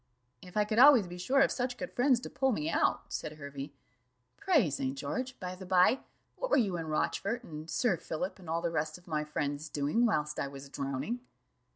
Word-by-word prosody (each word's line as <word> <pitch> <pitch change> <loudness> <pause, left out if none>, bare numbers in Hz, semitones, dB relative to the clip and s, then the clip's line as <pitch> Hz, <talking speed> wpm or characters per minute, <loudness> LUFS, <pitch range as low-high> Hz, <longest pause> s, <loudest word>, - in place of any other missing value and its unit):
"If 185 +1 -9
I 210 - +4
could 215 +2 0
always 260 -6 +8
be 175 0 -8
sure 265 +9 +3
of 275 - +4
such 250 -1 -2
good - - -5
friends 250 -1 +3
to - - -6
pull 265 -1 +1
me 160 -7 -1
out," - - +1
said 155 - -4
Hervey. 140 -1 -7 0.6
"Pray, 330 - +3
St. 135 0 -2
George, 255 - -4
by 180 -1 -4
the 185 +1 -9
bye, 185 +7 +4 0.4
what - - -2
were - - +4
you, 205 -8 +2
and 165 -2 -4
Rochfort, 200 +9 -1
and 155 -5 -8
Sir 215 -4 +1
Philip, 170 +4 -4
and 175 -4 -11
all 165 +1 -1
the - - 0
rest 155 0 -2
of 180 - -20
my 155 -2 -1
friends 150 0 -3
doing, 150 +12 +2
whilst 150 -8 0
I - - -1
was 140 0 -9
drowning?" 140 - -3
175 Hz, 215 wpm, -31 LUFS, 150-240 Hz, 0.6 s, always